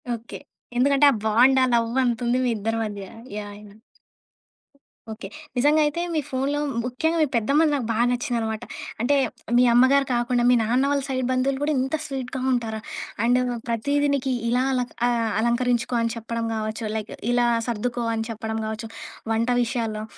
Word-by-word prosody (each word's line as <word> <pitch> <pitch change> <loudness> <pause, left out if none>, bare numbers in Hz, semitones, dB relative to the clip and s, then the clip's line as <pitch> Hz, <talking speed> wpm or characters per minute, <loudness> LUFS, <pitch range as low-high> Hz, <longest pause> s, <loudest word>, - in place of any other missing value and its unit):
Okay. 230 +1 -9 0.4
ఎందుకంటే 280 +3 +4
ఆ - - 0
bond, 245 +5 +5
ఆ - - +5
లవ్వంతుంది 240 +1 +1
మీ 245 - +2
ఇద్దరి 225 +2 -2
మధ్య. 205 -2 -6 0.3
యాహ్! 205 -1 -6
యాహ్! 210 +1 -16 1.3
ఓకే. 220 - -7 0.3
నిజంగా 295 +5 +4
అయితే 295 +3 -1
మీ 315 - +1
ఫోన్లో 270 +3 -1 0.2
ముఖ్యంగా 285 +7 -1
మీ - - +5
పెద్దమ్మది 285 +7 +3
నాకు 265 -5 -2
బా - - -1
నచ్చిందనమాట. 235 -2 -2 0.4
అంటే 270 +5 +3 0.4
మీ 250 - +6
అమ్మగారు 265 +3 +5
కాకుండా 240 0 +1
మీ 250 - +6
నాన్న 240 +4 +2
వాళ్ళ 285 -1 +1
సైడ్ 260 -1 -1
బంధువులు 265 +1 0
గూడా 300 +1 +1
ఇంత 265 +4 0
స్వీట్‌గా 265 -1 -4
ఉంటారా? 225 -3 -1 0.4
అండ్ 245 +2 +4 0.3
ప్రతీది 285 +5 +1
నీకి 265 -1 -1 0.2
ఇలా 250 +2 +2
అల 255 - +1 0.3
ఆహ్, 230 -2 0
అలంకరించుకో 240 +1 +1
అని 230 0 0
చెప్పడం 230 0 -4
గావచ్చు. 220 +1 -3
లైక్ 220 0 -4 0.2
ఇలా 245 0 +3 0.2
సర్దుకో 240 +1 -2
అని 225 0 -2
చెప్పడం 220 0 -4
గావచ్చు 220 +1 -5 0.4
వంట 230 +2 0
విషయాల్లో. 225 -3 -2
240 Hz, 160 wpm, -24 LUFS, 225-265 Hz, 1.3 s, మీ